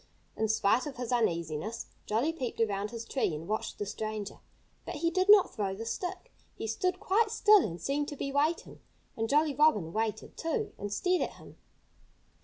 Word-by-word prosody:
In 220 - 0
spite 220 +5 +2
of 275 - -7
his 245 -1 -4
uneasiness, 170 -2 -1 0.2
Jolly 240 +10 +1
peeped 255 -9 -4
around 205 -2 0
his 230 0 -6
tree 240 - 0
and 160 +3 -7
watched 215 +1 -2
the 205 - -3
stranger. 215 0 -5 0.4
But - - -6
he 335 +2 0
did 370 +3 +1
not 410 -2 +7
throw 195 -3 -2
the 225 +3 -6
stick. 365 - -4 0.2
He - - -5
stood 365 - -1
quite 420 +3 +2
still 425 -2 +6
and 170 -3 -4
seemed 285 - -1
to 295 - -5
be 275 0 -3
waiting. 300 +4 0 0.4
And 225 0 -2
Jolly 300 0 +3
Robin 250 - +3
waited, 220 0 -2
too, 330 +7 -2
and 205 0 -4
stared 360 - +1
at - - -2
him. - - -14
240 Hz, 190 wpm, -30 LUFS, 210-330 Hz, 0.4 s, not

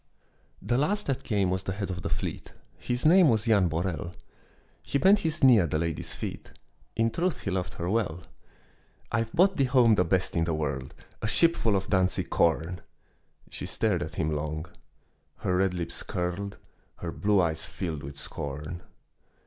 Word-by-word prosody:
The 120 - +1
last 205 +8 0
that 135 -2 -1
came 100 -4 +1
was 95 0 -1
the 95 - -3
head 95 -1 -3
of 90 0 -5
the - - -3
fleet, - - -4 0.3
His 125 +2 -2
name 175 0 +7
was 110 -3 +2
Jan 100 -5 +4
Borel; 85 +1 -3 0.7
He - - -1
bent 195 +7 +5
his 160 -7 -2
knee 125 -4 +8
at 85 -4 +1
the 75 - 0
lady's 85 0 -3
feet, - - -6 0.4
In 115 0 +2
truth 175 +1 -1
he 100 - -3
loved 90 -1 -2
her 85 - -4
well. 90 -5 -1 0.9
"I've 115 -1 0
brought 185 +6 +3
thee 135 - +3
home 125 -3 +5
the 90 - +4
best 90 +2 0
i' 85 - +2
the 80 -1 0
world, 70 -4 -3 0.3
A - - -1
shipful 115 -5 +3
of 95 +1 -2
Danzig 95 -1 +1
corn!" 85 +1 +1 0.7
She - - -5
stared 105 -6 0
at 75 0 -5
him 80 0 0
long; 75 +1 -3 0.7
her 90 - -1
red 95 -1 +1
lips 85 -2 -4
curled, 90 +3 -3 0.4
Her 85 - -5
blue 105 +2 +2
eyes 80 -3 0
filled 80 -6 -4
with 70 0 -8
scorn. 75 +6 -6
95 Hz, 180 wpm, -28 LUFS, 85-115 Hz, 0.9 s, knee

